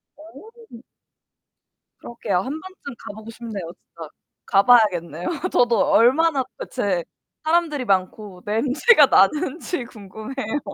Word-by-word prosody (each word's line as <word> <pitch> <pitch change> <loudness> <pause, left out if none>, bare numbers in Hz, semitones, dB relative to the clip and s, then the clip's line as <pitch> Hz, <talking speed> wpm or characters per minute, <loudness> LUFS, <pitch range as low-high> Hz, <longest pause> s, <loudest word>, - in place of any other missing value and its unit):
어. 405 - -15 1.2
그러게요. 225 -5 -3
1 260 +9 -4
번쯤 375 -8 -11
가보고 220 +2 -9
싶네요, 215 -7 -7
진짜. 165 -2 -13 0.4
가봐야겠네요. 195 -7 +3 0.2
저도 240 -2 +3
얼마나 270 +8 +3
도대체 195 -8 -2 0.4
사람들이 315 -4 0
많고 190 -1 -2
냄새가 280 - +4
나는지 295 - +1
궁금해요. 220 +5 -6
235 Hz, 250 characters per minute, -22 LUFS, 200-295 Hz, 1.2 s, 냄새가